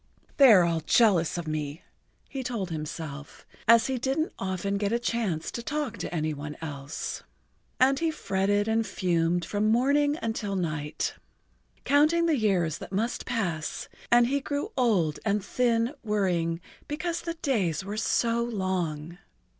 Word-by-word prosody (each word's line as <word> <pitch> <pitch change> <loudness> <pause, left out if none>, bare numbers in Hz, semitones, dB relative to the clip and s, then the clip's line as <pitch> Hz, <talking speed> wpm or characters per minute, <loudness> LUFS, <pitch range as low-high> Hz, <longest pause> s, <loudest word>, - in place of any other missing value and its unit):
"They 275 -4 +8
are 185 -4 +7
all 170 -1 +1
jealous 180 -1 +3
of 170 -2 -4
me," 155 0 -4 0.4
he 270 - -5
told 230 -8 -3
himself, 150 -2 -6 0.2
as 230 0 +7
he 260 -2 -1
didn't 275 +6 -1
often 195 +1 -2
get 200 0 0
a 235 - +2
chance 230 -9 -2
to 235 - -5
talk 295 0 -3
to - - -4
any 155 -2 -1
one 150 +1 -7
else. 145 -2 -5 0.6
And 270 +1 +4
he 330 - +1
fretted 205 -7 0
and 220 0 +1
fumed 175 -1 0
from 205 +1 0
morning 285 +5 +3
until 220 -3 -2
night, 155 -4 -2 0.7
counting 305 +4 +4
the 325 -2 +3
years 190 - +1
that - - -9
must 225 +5 -2
pass, 180 -11 -2 0.2
and 240 0 +6
he 280 +4 +1
grew 285 +9 -3
old 195 - +2
and 205 -2 0
thin 235 +1 +1
worrying 180 -6 0 0.3
because 335 +3 -2
the 335 -1 -4
days 190 - 0
were 205 +1 -4
so 230 +1 +1
long. 180 -7 -3
205 Hz, 155 wpm, -27 LUFS, 170-245 Hz, 0.7 s, They